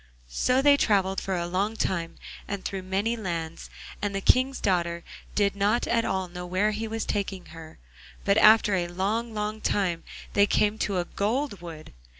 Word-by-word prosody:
So 255 - +1
they 285 0 +6
travelled 195 -6 +2
for 190 - -2
a 170 -1 -1
long 195 +5 -1
time, 170 -6 -2 0.3
and 200 -1 -5
through 195 -1 -3
many 195 +5 -1
lands, 170 -6 -5 0.3
and 205 -1 -2
the - - 0
King's 255 +6 +3
daughter 170 -3 0 0.3
did 200 -1 +2
not 205 +4 +2
at 230 -1 +1
all 190 -1 -1
know 180 0 -7
where 185 +4 +1
he 220 +1 -3
was 225 0 -3
taking 195 -2 -3
her, 160 -1 -11 0.5
but 200 +1 +4
after 215 -1 +6
a 175 -2 +1
long, 215 +6 -2
long 210 +1 -3
time 175 -4 0 0.3
they 200 0 +5
came 210 +1 +2
to 200 -2 0
a 175 - 0
gold 215 +2 -2
wood. 165 -3 -9
200 Hz, 180 wpm, -27 LUFS, 180-215 Hz, 0.5 s, they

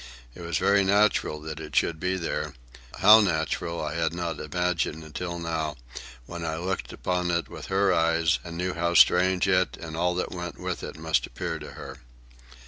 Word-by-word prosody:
It - - -11
was 85 -1 -2
very 100 0 +3
natural 100 -5 +2
that 80 0 -6
it - - -8
should 80 -2 +2
be 90 +2 -1
there,—how 75 - +2
natural 85 -2 -1
I 75 - -3
had 80 0 -1
not 85 -3 -3
imagined 80 0 -1
until 85 +3 -5
now, 80 -3 -3 0.5
when 85 +3 -7
I 80 -1 -2
looked 95 +3 -3
upon 90 -1 -2
it 85 0 0
with - - -9
her 95 0 +2
eyes 80 0 +2
and 85 -1 -7
knew 90 +1 -1
how 85 0 -1
strange 90 +1 +5
it 95 -1 +2
and 80 -2 -7
all 90 +2 +1
that 90 - -2
went 85 -1 -6
with - - -4
it - - -7
must 80 0 0
appear - - -4
to - - -9
her. - - -9
85 Hz, 185 wpm, -26 LUFS, 80-90 Hz, 0.5 s, strange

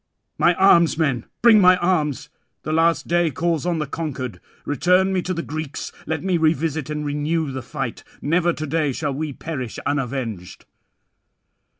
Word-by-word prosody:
My 175 - +4
arms, 170 -4 +5
men, 140 -8 0 0.2
bring 225 -3 +7
my 185 0 +6
arms! 165 -6 0 0.3
the 155 - -2
last 165 +1 +2
day 175 -1 +2
calls 165 +3 -1
on 175 -2 0
the 155 - -1
conquered. 140 -5 -5 0.3
Return 180 +7 +2
me 185 - +1
to 185 - -4
the 170 -2 -2
Greeks; 155 -1 -5 0.2
let 160 0 -2
me 185 -2 +1
revisit 160 -1 0
and 150 0 -3
renew 150 +1 -1
the 130 0 -5
fight. 135 -1 -5 0.2
Never 170 +3 +2
to 155 -2 -5
day 155 -2 0
shall 145 +1 -2
we 155 +3 -3
all - - -13
perish 130 -8 -5
unavenged." 125 -9 -3
155 Hz, 170 wpm, -22 LUFS, 140-170 Hz, 0.3 s, bring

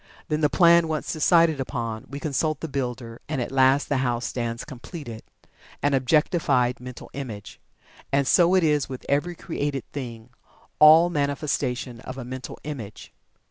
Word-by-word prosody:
Then, 155 0 0
the 150 - +3
plan 170 -1 +5
once 155 -1 -2
decided 165 -1 +3
upon, 115 -4 -4
we 140 - -6
consult 155 +1 -1
the 160 - -3
builder, 125 -4 -4
and 155 -3 -2
at 120 - -3
last 135 +1 +3
the 140 - 0
house 120 -2 -1
stands 115 -1 -3
completed 130 -3 -9 0.6
an 145 0 +2
objectified 135 -1 +2
Mental 125 0 -10
Image. 115 -7 -7 0.5
And 140 0 +2
so 175 +6 +4
it 185 - +4
is 150 -3 +1
with 130 -1 -8
every 155 +5 0
created 145 -5 -3
thing 120 -4 -7 0.5
all 160 +3 +8
manifestation 140 -4 -2
of 130 +3 -8
a 130 - -6
Mental 130 +1 -7
Image. 120 -9 -8
140 Hz, 155 wpm, -24 LUFS, 125-155 Hz, 0.6 s, all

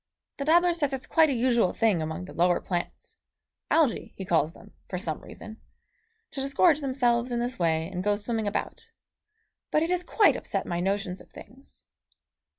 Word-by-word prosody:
The 280 - -3
dabbler 345 +3 +4
says 290 -5 -1
it's 265 0 -3
quite 320 -1 +4
a - - +1
usual 235 -5 +2
thing 215 -7 +2
among 160 +3 -4
the - - -11
lower 175 +1 +2
plants 175 -2 -5 0.5
Algæ 310 -8 +1
he 190 - -6
calls 160 -3 +2
them, - - -16 0.2
for 180 - -3
some 165 -4 -4
reason 220 +1 -11 0.7
to 270 - -4
disgorge 285 +3 +3
themselves 250 -3 +1
in 240 - -1
this 245 +1 -3
way 160 -1 +1
and 180 0 -5
go 205 +1 +2
swimming 220 +1 -2
about; 205 - -4 0.8
but 305 - +2
it 335 - -1
has 360 0 0
quite 420 +3 +4
upset - - -3
my 170 -1 -2
notions 195 0 -2
of - - -17
things. 270 +3 -15
235 Hz, 180 wpm, -27 LUFS, 180-275 Hz, 0.8 s, dabbler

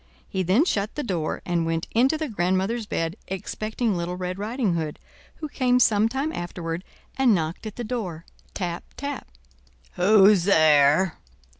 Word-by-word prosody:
He 190 - -2
then 190 - +3
shut 210 - -1
the 295 - -3
door 170 -8 -3
and 175 -2 0
went 165 0 -2
into 260 +7 +3
the 310 0 -3
grandmother's 195 +2 -1
bed, 165 +1 -2
expecting 215 +3 -2
Little 175 +1 -3
Red 180 +1 -4
Riding 220 -1 -1
Hood, 160 -3 -3 0.4
who 310 - -6
came 250 -3 +2
some 220 -2 +4
time 275 +5 -2
afterward 175 0 -5 0.4
and 250 -5 +5
knocked 165 +5 -3
at 210 - -8
the 240 - -5
door—tap, 180 -4 -5
tap. 285 -1 -5 0.7
"Who's 195 -1 +5
there?" 155 -1 +4
190 Hz, 150 wpm, -24 LUFS, 170-235 Hz, 0.7 s, and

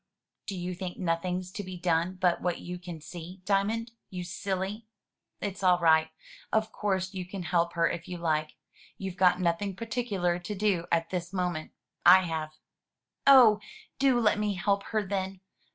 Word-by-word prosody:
"Do 195 - -4
you 180 +1 -3
think 180 0 -6
nothing's 180 +1 -1
to 205 - -5
be 185 -1 -7
done 175 +1 +1
but 180 -2 +1
what 180 -1 -1
you 180 0 -6
can 175 -3 -8
see. 175 +3 -9
Diamond, 215 +4 +1 0.2
you 180 -1 -5
silly! 195 +4 -3 0.5
It's 200 -2 -4
all 180 -2 +5
right. 160 -2 +4 0.4
Of 220 0 +1
course 190 -2 -1
you 185 -1 -3
can 180 +1 -6
help 170 -1 +1
her 170 -1 +3
if 165 - -4
you 180 - -5
like. 155 -2 -1 0.4
You've 190 -2 -5
got 180 0 +4
nothing 180 +2 0
particular 205 -6 -1
to 190 +4 -5
do 190 -4 +1
at 165 0 +1
this 175 -1 -3
moment; 180 -4 -2 0.3
I 185 +2 +9
have." 160 -2 -3 0.7
"Oh! 245 -6 +8 0.4
do 265 -3 +4
let 210 -2 +3
me 210 -1 0
help 200 +2 0
her, 215 -2 -1
then. 190 -1 -3
185 Hz, 170 wpm, -29 LUFS, 175-200 Hz, 0.7 s, I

